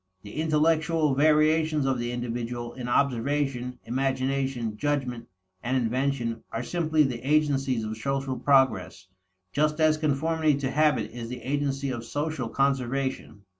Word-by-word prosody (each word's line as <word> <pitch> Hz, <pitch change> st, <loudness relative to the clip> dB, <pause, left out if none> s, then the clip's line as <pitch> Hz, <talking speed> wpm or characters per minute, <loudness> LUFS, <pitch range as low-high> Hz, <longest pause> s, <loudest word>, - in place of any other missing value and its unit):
The 105 Hz, +9 st, -5 dB
intellectual 160 Hz, -1 st, +2 dB
variations 155 Hz, +1 st, +3 dB
of 135 Hz, -2 st, +1 dB
the 120 Hz, 0 st, -2 dB
individual 120 Hz, 0 st, -4 dB
in 125 Hz, -2 st, -6 dB
observation, 130 Hz, 0 st, 0 dB
imagination, 130 Hz, -2 st, -1 dB
judgment, 125 Hz, -3 st, -2 dB, 0.3 s
and 130 Hz, +2 st, 0 dB
invention 125 Hz, -1 st, -1 dB
are 115 Hz, -, -3 dB
simply 155 Hz, +2 st, +1 dB
the 125 Hz, -4 st, -2 dB
agencies 135 Hz, -4 st, +1 dB
of 110 Hz, 0 st, -4 dB
social 135 Hz, +2 st, -2 dB
progress, 105 Hz, -, +2 dB, 0.5 s
just 150 Hz, +4 st, +1 dB
as 155 Hz, -1 st, +4 dB
conformity 155 Hz, +1 st, +1 dB
to 135 Hz, -1 st, -2 dB
habit 150 Hz, +1 st, +2 dB
is 115 Hz, -1 st, -7 dB
the 125 Hz, -, -7 dB
agency 140 Hz, 0 st, -1 dB
of 120 Hz, -2 st, -4 dB
social 145 Hz, +1 st, -3 dB
conservation. 135 Hz, -4 st, -1 dB
135 Hz, 130 wpm, -27 LUFS, 120-150 Hz, 0.5 s, as